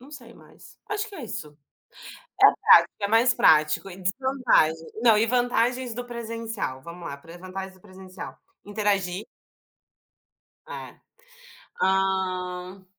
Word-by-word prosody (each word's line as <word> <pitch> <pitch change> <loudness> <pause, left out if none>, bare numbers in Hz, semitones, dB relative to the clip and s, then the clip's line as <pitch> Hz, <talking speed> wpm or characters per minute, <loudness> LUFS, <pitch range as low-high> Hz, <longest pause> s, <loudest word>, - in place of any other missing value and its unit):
Não 270 +4 -15
sei 240 -5 -12
mais. - - -18
Acho 415 +1 -2
que 415 - -12
é 300 - -7
isso. 150 -9 -7 0.8
É - - +10
prático, - - +5
é 200 - -1
mais 230 +3 +4
prático 155 +4 +3
e 175 - -10
desvantagem. 195 - +1
Não, 225 -3 +6
e 225 - +3
vantagens 245 +1 +1
do 245 +1 -5
presencial, 230 - -5
vamos 170 +2 -9
lá, 140 - -6
para 165 +4 -14
as 175 - -13
vantagens 190 +1 -7
do 185 - -21
presencial: 185 -1 -11 0.3
interagir 205 -1 -1 1.4
É. - - -8 0.9
Hã. 185 -1 -1
195 Hz, 135 wpm, -25 LUFS, 180-235 Hz, 1.4 s, É